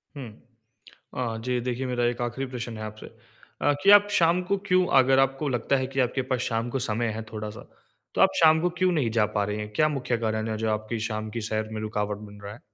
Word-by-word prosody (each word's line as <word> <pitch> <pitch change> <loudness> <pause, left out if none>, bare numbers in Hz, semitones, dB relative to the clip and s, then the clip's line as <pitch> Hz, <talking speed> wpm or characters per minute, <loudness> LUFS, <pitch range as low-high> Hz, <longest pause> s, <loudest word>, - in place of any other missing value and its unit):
हुँ। 135 -4 -7 0.9
अ, 120 -3 -2
जी, 125 -1 0
देखिए 125 +1 -3
मेरा 125 -1 -1
एक 120 +1 -1
आख़िरी 120 +3 -3
प्रश्न 120 -2 -5
है - - -6
आपसे। 110 0 -8
अ, - - -4
कि 200 - +6
आप 205 0 +8
शाम 175 -2 +3
को 200 - +3
क्यों 185 -2 +3
अगर 135 0 +4
आपको 135 +2 +1
लगता 130 +1 +1
है 130 -1 -1
कि 135 +1 -2
आपके 130 +1 0
पास 125 - 0
शाम 115 -1 -1
को 135 - -1
समय 120 -2 -1
है 110 - -4
थोड़ा-सा, 105 0 -7 0.5
तो - - -1
आप - - +6
शाम 160 -1 +6
को 180 - +1
क्यों 185 0 +3
नहीं 140 -9 +1
जा 110 -2 +2
पा 105 - +2
रहे 105 +1 -3
हैं? 105 0 -6
क्या 155 +7 +3
मुख्य 125 -5 -2
कारण 110 -1 -1
है 110 - -2
जो 110 0 -1
आपकी 110 +2 -2
शाम 110 -1 -4
की 115 - -4
सैर 110 0 -1
में 110 - -4
रुकावट 105 -1 -2
बन 105 -1 -12
रहा 100 0 -7
है? 115 - -15
120 Hz, 245 wpm, -26 LUFS, 110-135 Hz, 0.9 s, आप